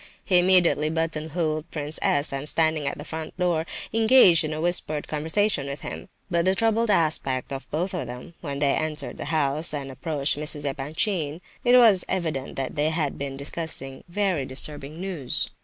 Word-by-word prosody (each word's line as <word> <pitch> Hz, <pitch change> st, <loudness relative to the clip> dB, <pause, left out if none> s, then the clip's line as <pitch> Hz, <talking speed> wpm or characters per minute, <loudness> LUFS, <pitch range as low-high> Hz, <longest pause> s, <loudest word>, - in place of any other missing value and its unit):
He 180 Hz, -2 st, +4 dB
immediately 175 Hz, -4 st, +4 dB
button 160 Hz, -1 st, -2 dB
holed 155 Hz, 0 st, -2 dB
Prince 150 Hz, 0 st, -4 dB
S., 145 Hz, 0 st, +2 dB
and 135 Hz, +2 st, +1 dB
standing 160 Hz, -3 st, +3 dB
at -, -, -2 dB
the 145 Hz, -, -8 dB
front 160 Hz, +1 st, -7 dB
door, 170 Hz, -3 st, 0 dB, 0.3 s
engaged 220 Hz, -7 st, +6 dB
in 155 Hz, -, -3 dB
a 155 Hz, -, -4 dB
whispered 155 Hz, -3 st, 0 dB
conversation 160 Hz, +1 st, 0 dB
with 140 Hz, 0 st, -5 dB
him. 80 Hz, +1 st, -7 dB, 0.2 s
By 170 Hz, -1 st, +2 dB
the 190 Hz, +2 st, +2 dB
troubled 225 Hz, +1 st, +1 dB
aspect 150 Hz, -8 st, +1 dB
of 135 Hz, -, -6 dB
both 175 Hz, +6 st, -2 dB
of 165 Hz, -9 st, -3 dB
them, 125 Hz, +7 st, -9 dB
when 140 Hz, -4 st, -4 dB
they 140 Hz, -1 st, +2 dB
entered 155 Hz, -4 st, -3 dB
the -, -, -5 dB
house, 150 Hz, 0 st, +1 dB
and 135 Hz, -2 st, -5 dB
approached 145 Hz, 0 st, +1 dB
Mrs. 150 Hz, -1 st, -3 dB
Epanchin, 150 Hz, +3 st, -1 dB, 0.2 s
it 245 Hz, 0 st, +6 dB
was 220 Hz, -7 st, +6 dB
evident 155 Hz, -7 st, -2 dB
that 135 Hz, -1 st, -3 dB
they 150 Hz, +1 st, +1 dB
had 155 Hz, -3 st, -2 dB
been 135 Hz, -1 st, -4 dB
discussing 140 Hz, -2 st, -5 dB
very 185 Hz, -5 st, 0 dB
disturbing 145 Hz, +3 st, -5 dB
news. 175 Hz, -9 st, -1 dB
155 Hz, 180 wpm, -25 LUFS, 140-175 Hz, 0.3 s, engaged